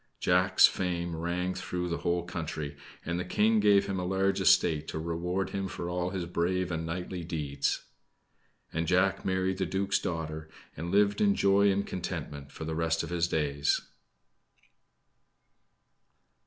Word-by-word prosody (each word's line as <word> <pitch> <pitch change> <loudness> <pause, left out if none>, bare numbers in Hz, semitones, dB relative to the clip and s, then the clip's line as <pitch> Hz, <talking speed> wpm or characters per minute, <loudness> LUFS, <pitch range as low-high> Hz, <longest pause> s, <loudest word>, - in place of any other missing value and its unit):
Jack's - - +5
fame 85 -2 -1
rang 90 +3 -2
through 90 -1 -3
the 85 -1 -2
whole 85 0 0
country, 80 -4 -5 0.3
and 85 +1 -1
the - - -1
King 110 +5 +2
gave 105 -1 +5
him 95 -1 -2
a - - -2
large 95 +2 +1
estate 80 -2 +4
to - - -4
reward 85 +4 -2
him 95 -1 -2
for 85 -1 -5
all 90 0 -1
his 95 -2 -3
brave 90 +1 -1
and 80 0 -3
knightly 90 +1 -4
deeds. 75 -4 -2 0.9
And 80 0 -1
Jack 90 +2 +2
married 95 0 0
the 95 - 0
duke's 95 +2 0
daughter, 80 -2 -4 0.3
and 85 +2 -5
lived 100 +2 +3
in 205 -1 +4
joy 100 +1 +4
and 100 +1 0
contentment 75 -6 -5
for 80 - -7
the 80 - -3
rest 80 0 0
of - - -6
his 85 -1 +1
days. 75 -3 +1
90 Hz, 155 wpm, -29 LUFS, 80-95 Hz, 0.9 s, Jack's